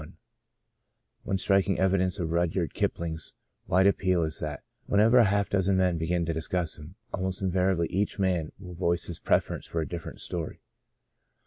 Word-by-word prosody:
ONE 95 Hz, -, 0 dB
striking 95 Hz, 0 st, +2 dB
evidence 95 Hz, 0 st, +2 dB
of 85 Hz, -4 st, -2 dB
Rudyard 85 Hz, 0 st, 0 dB
Kipling's 80 Hz, -2 st, -2 dB, 0.3 s
wide 95 Hz, +2 st, +4 dB
appeal 95 Hz, -3 st, +3 dB
is 80 Hz, -1 st, -1 dB
that, 75 Hz, -3 st, -5 dB, 0.2 s
when 100 Hz, -, +2 dB
ever 115 Hz, +4 st, +6 dB
half 100 Hz, 0 st, +1 dB
a -, -, -36 dB
dozen 95 Hz, -1 st, +2 dB
men 90 Hz, -3 st, +2 dB
begin 85 Hz, +1 st, 0 dB
to 85 Hz, -, -1 dB
dis 80 Hz, 0 st, -4 dB
cuss 90 Hz, -3 st, -1 dB
him, 80 Hz, +5 st, -11 dB, 0.2 s
almost 95 Hz, 0 st, -2 dB
invariably 90 Hz, -2 st, +2 dB
each 100 Hz, +2 st, 0 dB
man 90 Hz, -5 st, 0 dB
will 90 Hz, -2 st, -10 dB
voice 85 Hz, 0 st, 0 dB
his 85 Hz, -, -5 dB
preference -, -, 0 dB
for 85 Hz, -, -3 dB
a 80 Hz, -, -2 dB
different 85 Hz, -2 st, -7 dB
story. 85 Hz, -3 st, -4 dB
90 Hz, 175 wpm, -28 LUFS, 85-95 Hz, 0.3 s, ever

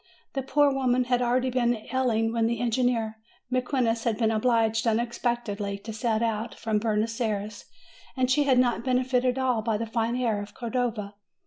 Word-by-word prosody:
The 270 Hz, -, -1 dB
poor 285 Hz, +1 st, +3 dB
woman 255 Hz, -2 st, +2 dB
had 245 Hz, 0 st, +1 dB
already 250 Hz, +1 st, +1 dB
been 240 Hz, -1 st, +2 dB, 0.2 s
ailing 225 Hz, -3 st, +1 dB
when 230 Hz, -1 st, +2 dB
the 235 Hz, -1 st, -1 dB
engineer 235 Hz, -2 st, 0 dB, 0.3 s
Mequinez 250 Hz, -3 st, 0 dB
had 225 Hz, -3 st, 0 dB
been 225 Hz, -1 st, +2 dB
obliged 225 Hz, 0 st, +2 dB
unexpect 235 Hz, +1 st, 0 dB
edly 200 Hz, -1 st, -4 dB
to 220 Hz, -, -6 dB
set 220 Hz, 0 st, 0 dB
out 225 Hz, 0 st, -2 dB
from 220 Hz, -2 st, -1 dB
Buenos 225 Hz, +2 st, -1 dB
Ayres, 210 Hz, -2 st, -3 dB, 0.5 s
and 255 Hz, -1 st, +2 dB
she 290 Hz, +2 st, +3 dB
had 265 Hz, -2 st, +4 dB
not 245 Hz, -2 st, +2 dB
benefited 255 Hz, 0 st, +1 dB
at 265 Hz, -, 0 dB
all 250 Hz, -4 st, +1 dB
by 220 Hz, -1 st, 0 dB
the 230 Hz, -, -3 dB
fine 230 Hz, +1 st, -1 dB
air 230 Hz, -5 st, 0 dB
of 205 Hz, 0 st, -10 dB
Cordova. 235 Hz, -4 st, -2 dB
235 Hz, 185 wpm, -26 LUFS, 220-250 Hz, 0.5 s, had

